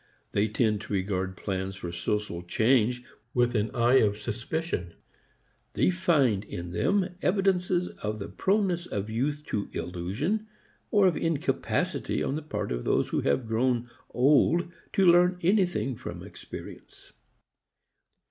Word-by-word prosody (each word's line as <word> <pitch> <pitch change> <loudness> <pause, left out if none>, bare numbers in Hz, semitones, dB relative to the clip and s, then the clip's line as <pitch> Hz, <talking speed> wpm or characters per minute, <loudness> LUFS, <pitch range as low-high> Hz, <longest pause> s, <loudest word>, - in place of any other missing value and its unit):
They 105 +1 +2
tend 110 -1 +1
to 105 - -6
regard 95 -1 -1
plans 95 -1 -3
for 85 -2 -6
social 85 +1 -2
change 120 +6 +2 0.3
with 120 -1 +3
an 110 0 +1
eye 120 +2 +5
of 105 -1 +2
suspicion. 120 - -3 0.8
They - - +3
find 145 - +2
in 85 -4 -7
them 190 - +1
evidences 180 -2 +1
of 105 0 -5
the 100 - -5
proneness 190 -3 0
of 105 +2 -4
youth 145 +6 -1
to 100 - -2
illusion, 105 - -2 0.4
or 205 -2 +4
of 180 -4 +4
incapacity 165 -3 -1
on - - -1
the 155 - -2
part 155 - -4
of - - -2
those - - +1
who - - 0
have 70 - +1
grown 120 +1 0 0.2
old 150 +6 +3 0.2
to 195 - +3
learn 180 +1 +5
anything 175 - +2
from - - -7
experience. - - -11
120 Hz, 140 wpm, -28 LUFS, 105-175 Hz, 0.8 s, eye